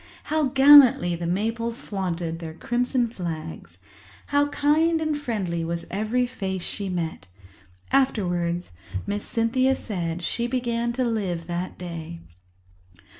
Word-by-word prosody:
How 310 -1 +3
gallantly 265 -9 +7
the 170 0 -4
maples 230 +5 -1
flaunted 175 -4 -3
their 160 -2 -7
crimson 245 +4 0
flags! 160 - -6 0.5
How 285 0 +2
kind 310 +3 +2
and 310 -1 0
friendly 205 -12 -2
was 170 +1 -3
every 220 +6 0
face 190 -7 -4
she 200 -2 -4
met! 170 - -3 0.6
Afterwards, 175 -10 +1 0.3
Miss 205 0 -2
Cynthia 255 +3 +1
said 175 -7 -4
she 235 +7 -1
began 235 -2 -1
to 255 +1 0
live 190 -8 -2
that 175 +1 -4
day. 165 - -7
205 Hz, 125 wpm, -25 LUFS, 175-250 Hz, 0.6 s, gallantly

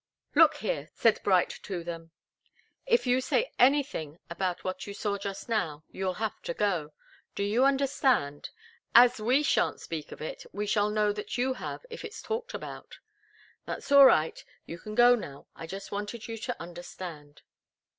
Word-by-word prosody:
"Look - - +6
here," - - -3
said - - +3
Bright 485 -1 +2
to 180 -4 -5
them. 165 -1 -7 0.8
"If 475 - +3
you 250 +1 +3
say 470 - 0
anything 260 - +2
about 180 0 -2
what 185 +1 -4
you 200 - -6
saw 200 -1 -2
just 195 -1 -6
now, 170 -10 -1
you'll 190 -1 -2
have 220 +1 -3
to 170 - -4
go. 170 -8 -1 0.4
Do 200 - -1
you 220 +6 +3
understand? 265 - +1 0.5
As 240 -1 +7
we 255 +7 +3
shan't - - +1
speak 160 -3 -6
of - - -9
it, 155 - -6
we 205 +1 -3
shall 205 0 +2
know 210 -1 +1
that 210 +3 -5
you 260 +2 +1
have, 255 - -7
if 465 - -7
it's 450 -1 -8
talked 470 +2 -4
about. - - -8 0.7
That's - - -6
all 280 -1 +10
right 160 -9 +2 0.2
you 170 - -8
can 215 +4 -8
go 245 +1 +7
now. 145 - -5
I 165 - -8
just 195 +3 -7
wanted 205 +3 -5
you 230 - -5
to 245 +2 -4
understand." 170 -3 -9
210 Hz, 175 wpm, -29 LUFS, 175-255 Hz, 0.8 s, all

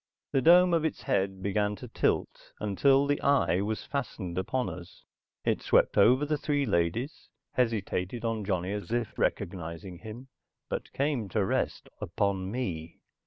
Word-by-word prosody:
The 135 - +2
dome 175 +4 +6
of 165 -2 +3
its 160 - -2
head 95 -7 0
began 105 +1 0
to - - -9
tilt - - -1
until 135 +7 +3
the 145 0 0
eye 135 -10 +3
was 105 +2 -3
fastened 115 -10 -4
upon 125 +8 -1
us. 90 +1 -9 0.4
It - - +1
swept - - +3
over 130 +5 +5
the 150 0 -1
three 145 -2 0
ladies, 105 - -1 0.2
hesitated 115 -2 -1
on 115 -2 -1
Johnny 95 -2 -1
as 105 -1 -5
if 120 -2 -1
recognizing 85 +1 -3
him, 115 +6 -9 0.4
but - - -4
came 135 -6 -1
to 100 +1 +1
rest - - -1
upon 95 +1 -1
me. 90 -9 -4
110 Hz, 155 wpm, -29 LUFS, 95-135 Hz, 0.4 s, dome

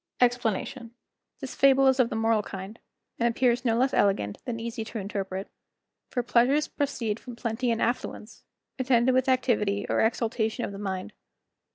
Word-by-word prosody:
EXPLANATION.—This 245 +2 -3
fable 270 0 +5
is 265 0 +4
of 240 -2 +4
the - - -4
moral 225 -1 +2
kind, 195 +2 -8 0.4
and 235 0 +3
appears 240 +1 +1
no 230 -2 +2
less 260 +3 +2
elegant 195 - +1
than 230 -2 -3
easy 230 0 -4
to 225 +1 -7
interpret. 195 -1 -4 0.6
For 245 - -1
pleasures 250 +5 +3
proceed 235 -7 -2
from 245 -2 -9
plenty 235 +1 -2
and 230 -1 +1
affluence, 235 -2 -3 0.4
attended 250 -1 +3
with 260 +1 +2
activity 225 -6 +1
or - - +2
exultation 225 0 0
of - - -6
the 200 - -8
mind. 190 -2 -4
235 Hz, 160 wpm, -27 LUFS, 215-255 Hz, 0.6 s, fable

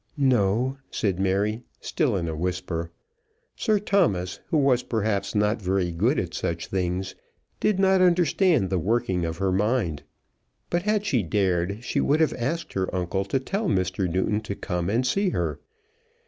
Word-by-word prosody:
"No," 125 -1 +2
said 95 -5 -1
Mary, 100 +4 0 0.2
still 135 -9 0
in 85 -3 -1
a 80 - -3
whisper. 85 0 -3 0.7
Sir 215 -2 +2
Thomas, 170 - +1
who 160 - +1
was 135 -4 +3
perhaps 105 -4 -1
not 105 +2 +1
very 95 -2 0
good 85 - +1
at - - -2
such 85 0 -2
things, 95 0 -2 0.5
did 210 -3 +2
not 190 -1 +4
understand 175 - +3
the 95 - +1
working 95 -2 0
of 80 0 -3
her 95 0 0
mind. 100 - 0 0.7
But 175 - +1
had 210 +1 0
she 130 - +2
dared, 95 +2 0
she - - 0
would 150 +3 +2
have 160 -3 +3
asked 165 +8 -3
her 95 -1 -1
uncle 95 +2 -1
to 100 +7 0
tell 195 +9 -2
Mr. 95 - 0
Newton 100 +4 0
to 100 -2 -5
come 90 -2 -2
and 120 +5 +1
see 195 +10 +1
her. - - -2
105 Hz, 165 wpm, -25 LUFS, 95-135 Hz, 0.7 s, not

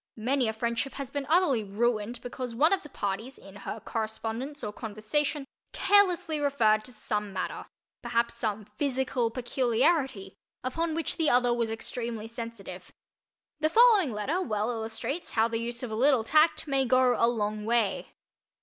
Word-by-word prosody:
Many 250 +3 +1
a 220 - -1
friendship 235 +4 -2
has 275 -2 -6
been 285 -1 -3
utterly 315 -9 +3
ruined 220 +2 -1
because 245 -1 -5
one 310 +9 +4
of 385 - +1
the 295 - -12
parties, 220 +3 -4
in 195 0 -14
her 215 - -6
correspondence 225 +6 -4
or 210 - -4
conversation, 240 +8 -2 0.3
carelessly 365 -6 +3
referred 230 -7 +2
to 255 - -7
some 210 -3 -3
matter—perhaps 235 +5 -3
some 215 -3 -3
physical 260 -4 0
peculiarity—upon 255 - -1
which 330 - -2
the 320 -2 +2
other 245 -1 +3
was 235 -1 0
extremely 225 0 -4
sensitive. 230 -3 -8 0.7
The 310 0 +2
following 430 - +6
letter 245 - -1
well 215 - -1
illustrates 230 +7 -4
how 225 0 +3
the 225 -1 -2
use 235 +1 -4
of 240 - -4
a - - -2
little 255 0 +4
tact 310 +7 +3
may 275 -1 +2
go 255 0 +4
"a 230 - +3
long 215 -2 -1
way." 225 -2 0
240 Hz, 155 wpm, -28 LUFS, 220-280 Hz, 0.7 s, following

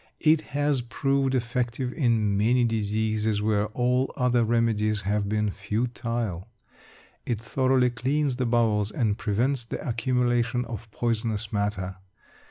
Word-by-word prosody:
It 155 0 +4 0.2
has 145 -3 +2
proved 135 +2 0
effective 125 +1 -1
in 115 -8 +1
many 120 +5 +3
diseases 110 -1 0
where 105 0 +1
all 125 +4 0
other 125 -2 +2
remedies 110 -2 +1
have 100 +1 0
been 105 -1 0
futile; 110 -1 -3 0.8
it 115 -3 -2
thoroughly 130 +1 +2
cleans 135 +2 0
the 125 -2 0
bowels, 110 -3 +2
and 110 -2 0
prevents 120 +5 0
the 115 - -6
accumulation 120 0 +1
of 115 -1 -7
poisonous 110 -1 -2
matter. 100 -2 -2
115 Hz, 125 wpm, -26 LUFS, 105-125 Hz, 0.8 s, It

